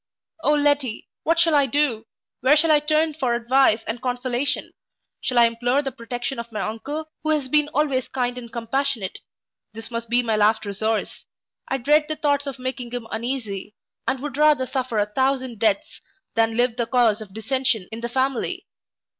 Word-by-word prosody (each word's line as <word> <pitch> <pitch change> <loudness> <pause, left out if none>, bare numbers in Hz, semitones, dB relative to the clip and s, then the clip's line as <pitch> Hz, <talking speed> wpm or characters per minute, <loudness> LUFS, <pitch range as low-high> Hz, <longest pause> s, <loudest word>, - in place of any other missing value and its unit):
O 295 +2 +4
Letty, 290 -5 +1
what 330 +1 +1
shall 335 -1 +4
I 285 -2 +4
do? 250 -5 +1 0.3
where 270 +5 +5
shall 315 +1 +4
I 300 - +6
turn 310 +1 +1
for 260 -5 0
advice 235 -1 +3
and 230 +2 -4
consolation? 250 +1 -1 0.5
shall 250 - -1
I 235 - +8
implore 245 +4 +1
the 270 - -2
protection 245 +1 -5
of 235 0 -7
my 215 - -4
uncle, 290 +9 -4
who 310 - -2
has 300 -4 +1
been 300 +2 +2
always 285 -4 0
kind 245 -2 -1
and 240 -2 -8
compassionate. 235 -2 -1 0.5
This 225 +2 -9
must 230 -1 -4
be 245 +1 +3
my 225 -2 +1
last 215 +1 +3
resource. 215 +2 -2 0.4
I 270 - 0
dread 295 +4 +3
the 310 - -1
thoughts 285 -1 0
of 275 -1 -4
making 255 -1 -4
him 245 -1 -5
uneasy; 220 -4 -4 0.3
and 265 0 0
would 290 -2 -4
rather 300 -3 +4
suffer 255 -3 -2
a 205 - +3
thousand 260 +1 -1
deaths 210 -3 0 0.3
than 225 0 +1
live 245 -1 +2
the 235 -2 0
cause 235 -4 +3
of 210 -3 -9
dissension 225 -2 -1
in 225 +1 -6
the 235 - -3
family. 260 0 -1
250 Hz, 185 wpm, -23 LUFS, 230-280 Hz, 0.5 s, I